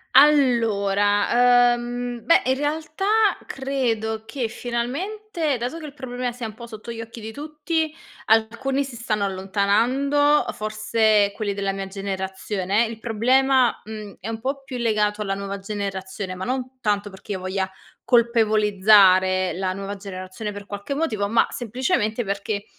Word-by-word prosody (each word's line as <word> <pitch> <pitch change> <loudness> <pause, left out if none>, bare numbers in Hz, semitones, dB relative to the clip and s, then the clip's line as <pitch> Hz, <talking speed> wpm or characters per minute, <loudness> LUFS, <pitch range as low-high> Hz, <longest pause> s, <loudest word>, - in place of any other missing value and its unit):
Allora, 240 -3 +4
uhm, 240 0 -4
beh, 335 - +5
in 260 - +3
realtà 310 +5 -3 0.4
credo 230 -5 -2
che 235 -1 -3
finalmente, 300 - -2
dato 245 +7 -4
che 315 - -8
il 285 - -9
problema 250 -3 -4
sia 240 -2 -5
un 215 - -9
po' 235 +2 -10
sotto 220 0 -8
gli 230 - -7
occhi 225 0 -8
di 220 +1 -6
tutti, 305 +3 -3 0.3
alcuni 235 +5 +2
si 265 -3 -8
stanno 215 -3 -1
allontanando. 230 +10 +2
Uhm, - - -3
forse 215 -1 +2
quelli 205 -2 -2
della 195 -1 -1
mia 195 0 -5
generazione. 195 +2 -2
Il 225 -1 -8
problema, 255 +3 +3
mhmm, 215 -2 -8
è 195 - -7
un 225 0 -4
po' 275 +2 -3
più 265 -2 -6
legato 215 -2 +1
alla 195 -2 -1
nuova 200 0 -4
generazione. 195 -1 -5
Ma 185 - -6
non 255 +1 -3
tanto 205 -1 0
perché 190 +2 -11
io 190 - -4
voglia 190 0 -2 0.3
colpevolizzare 210 -5 +4
la 185 0 -2
nuova 195 +1 -5
generazione 195 +1 -6
per 205 0 -9
qualche 205 +6 -5
motivo, 220 -10 -1
ma, 230 +1 +3
semplicemente, 240 -1 -1
perché 200 +1 -3
220 Hz, 150 wpm, -23 LUFS, 200-255 Hz, 0.4 s, beh